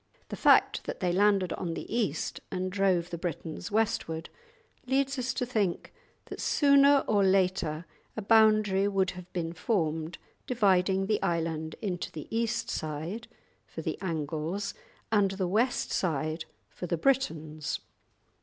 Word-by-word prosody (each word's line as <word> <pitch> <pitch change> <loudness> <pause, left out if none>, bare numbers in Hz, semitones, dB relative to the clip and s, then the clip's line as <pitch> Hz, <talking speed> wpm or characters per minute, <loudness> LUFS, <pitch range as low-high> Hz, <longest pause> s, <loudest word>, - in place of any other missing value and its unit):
The - - -4
fact - - +4
that - - -5
they 180 -3 +1
landed 195 -1 +3
on 170 -2 -3
the - - -5
East 205 -11 -1
and 185 0 -3
drove 185 -3 +1
the 170 - -4
Britons 170 0 -5
westward, 185 -7 -1 0.6
leads 275 +1 +1
us 255 +1 -1
to 250 - -1
think 210 -8 -1 0.3
that - - -7
sooner 280 -1 +5
or 205 -2 +3
later 185 -4 +1 0.3
a - - -1
boundary 215 -2 +4
would 195 -2 +1
have 180 0 -11
been 170 -2 -3
formed 160 -4 -1 0.3
dividing 195 -5 +2
the 210 +1 0
island 160 -2 -1
into 180 -4 -3
the 155 - -8
east 230 0 0
side 160 +9 -4 0.4
(for - - -7
the - - -3
Angles) 165 +2 -3 0.4
and 205 -3 +4
the 190 -1 -2
west 230 +7 +1
side 155 -1 -1 0.2
(for 180 - -7
the 170 - 0
Britons). 160 - 0
185 Hz, 145 wpm, -29 LUFS, 165-215 Hz, 0.6 s, sooner